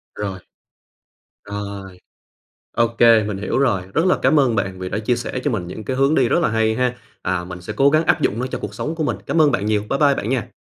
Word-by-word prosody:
Rồi. 100 Hz, -2 st, -4 dB, 1.1 s
Rồi. 100 Hz, -2 st, -7 dB, 0.8 s
Ô 115 Hz, 0 st, +4 dB
kê, 115 Hz, -1 st, +5 dB
mình 105 Hz, -2 st, -3 dB
hiểu 100 Hz, -, -2 dB
rồi, 120 Hz, -9 st, +2 dB
rất 165 Hz, -, +2 dB
là 185 Hz, -, +3 dB
cám 155 Hz, -, +4 dB
ơn 125 Hz, -5 st, +2 dB
bạn 95 Hz, -2 st, -2 dB
vì 90 Hz, -, -4 dB
đã 105 Hz, -, -2 dB
chia 120 Hz, +3 st, 0 dB
sẻ 120 Hz, +2 st, -4 dB
cho 145 Hz, -, 0 dB
mình 95 Hz, -7 st, -3 dB
những 105 Hz, +4 st, -7 dB
cái 130 Hz, -1 st, -3 dB
hướng 135 Hz, +3 st, +3 dB
đi 125 Hz, -3 st, +3 dB
rất -, -, +3 dB
là 170 Hz, -, +1 dB
hay 110 Hz, 0 st, +1 dB
ha, 125 Hz, 0 st, 0 dB, 0.3 s
à, 90 Hz, -1 st, -1 dB
mình 90 Hz, 0 st, -8 dB
sẽ 105 Hz, +4 st, -6 dB
cố 135 Hz, +5 st, +4 dB
gắng 155 Hz, +2 st, +3 dB
áp -, -, +2 dB
dụng 110 Hz, -, 0 dB
nó 125 Hz, -, -2 dB
cho -, -, -5 dB
cuộc 105 Hz, 0 st, -6 dB
sống 155 Hz, +9 st, -4 dB
của 160 Hz, -, -2 dB
mình. -, -, -1 dB
Cám 165 Hz, -, +2 dB
ơn 150 Hz, -, +4 dB
bạn 105 Hz, -5 st, -1 dB
nhiều, 105 Hz, -1 st, +1 dB
bye 135 Hz, -, 0 dB
bye 145 Hz, -2 st, +5 dB
bạn 110 Hz, -, -3 dB
nha. 130 Hz, -4 st, -1 dB
110 Hz, 265 wpm, -20 LUFS, 100-135 Hz, 1.1 s, kê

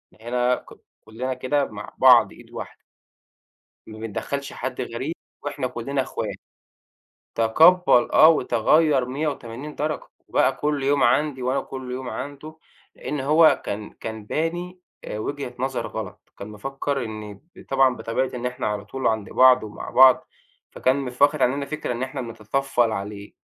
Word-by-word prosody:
إحنا 115 Hz, +2 st, -10 dB
هنا 125 Hz, 0 st, +2 dB
ك -, -, -12 dB, 0.4 s
كُلّنا 125 Hz, +4 st, -4 dB
كده 140 Hz, +3 st, 0 dB
مع -, -, -9 dB
بعض -, -, +7 dB
إيد -, -, -16 dB
واحدة." -, -, -8 dB, 1.1 s
ما 110 Hz, 0 st, -10 dB
بندَخّلش 140 Hz, +6 st, -4 dB
حد 130 Hz, +1 st, -5 dB
غريب، 130 Hz, +6 st, -4 dB, 0.3 s
وإحنا 145 Hz, -2 st, -3 dB
كلّنا 135 Hz, +3 st, -2 dB
إخوا -, -, -4 dB, 1.1 s
تَقَبَّل 155 Hz, +5 st, +5 dB
آه 155 Hz, -, +8 dB
وتَغَيَّر 145 Hz, 0 st, +3 dB
180 140 Hz, 0 st, -4 dB
درجة 155 Hz, +1 st, -3 dB, 0.2 s
وبَقى 135 Hz, -, +2 dB
كل 145 Hz, -1 st, -1 dB
يوم 140 Hz, 0 st, +2 dB
عندي 135 Hz, +2 st, +2 dB
وأنا 130 Hz, +2 st, 0 dB
كل 130 Hz, -1 st, -8 dB
يوم 125 Hz, 0 st, -5 dB
عنده، 145 Hz, +6 st, -7 dB, 0.4 s
لإن 150 Hz, -, -4 dB
هو 155 Hz, +4 st, +4 dB
كان، 105 Hz, +1 st, -4 dB
كان 110 Hz, -1 st, -8 dB
باني 175 Hz, -, -3 dB, 0.2 s
آآ 105 Hz, -, -5 dB
وجهة 140 Hz, +1 st, -4 dB
نظر 130 Hz, 0 st, -2 dB
غلط. -, -, -8 dB
كان 100 Hz, -, -7 dB
مِفَكَّر 135 Hz, +4 st, -3 dB
إن 110 Hz, -2 st, -7 dB, 0.2 s
ب -, -, -14 dB
طبعًا 135 Hz, -2 st, +3 dB
بطبيعة 125 Hz, +3 st, -2 dB
إن 125 Hz, 0 st, -5 dB
إحنا 125 Hz, -3 st, -2 dB
على 105 Hz, -1 st, -3 dB
طول 135 Hz, +5 st, -2 dB
عند 110 Hz, -3 st, -1 dB
بعض 130 Hz, -1 st, +6 dB
ومع 105 Hz, -1 st, -8 dB
بعض، 130 Hz, 0 st, +6 dB, 0.4 s
فكان 130 Hz, +1 st, +1 dB
مف 125 Hz, 0 st, -6 dB
واخد 145 Hz, 0 st, +4 dB
عننا 140 Hz, +3 st, +1 dB
فكرة 155 Hz, -1 st, -4 dB
إن 120 Hz, +2 st, -3 dB
إحنا 130 Hz, 0 st, -4 dB
بنتطفل 120 Hz, +1 st, -1 dB
عليه، 100 Hz, 0 st, -6 dB
130 Hz, 155 wpm, -23 LUFS, 115-145 Hz, 1.1 s, آه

